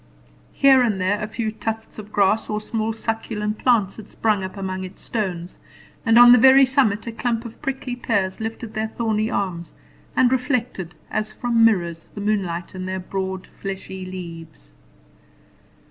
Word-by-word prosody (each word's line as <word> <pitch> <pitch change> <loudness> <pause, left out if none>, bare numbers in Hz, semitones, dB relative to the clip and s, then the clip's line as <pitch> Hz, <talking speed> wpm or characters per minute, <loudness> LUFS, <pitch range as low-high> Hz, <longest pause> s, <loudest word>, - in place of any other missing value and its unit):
Here 270 -2 +6
and 220 -5 +1
there 190 +3 0
a 215 - -2
few 220 0 -3
tufts 220 0 -5
of 210 0 -10
grass 205 +2 +2
or 210 - -1
small 220 0 -2
succulent 220 -1 -3
plants 220 -6 +2
had 220 -2 -10
sprung 210 -3 0
up 190 +2 -6
among 190 -1 -3
its 185 - -10
stones, 185 -6 -4 0.4
and 225 -1 +4
on 240 0 +10
the 245 - +8
very 265 +3 +8
summit 255 -6 +2
a 230 - -4
clump 230 0 -2
of 235 - -10
prickly 270 -3 -3
pears 200 -6 -1
lifted 225 0 -5
their 220 0 -1
thorny 220 -1 -1
arms, 180 -7 -3 0.4
and 250 -1 +4
reflected, 245 - -1 0.2
as 215 0 -1
from 235 0 +1
mirrors, 170 -7 +2
the 205 - -5
moonlight 190 -5 -1
on 185 0 -5
their 190 0 -3
broad 190 0 -4
fleshy 190 -1 -6
leaves. 165 - -9
215 Hz, 165 wpm, -22 LUFS, 190-230 Hz, 0.4 s, on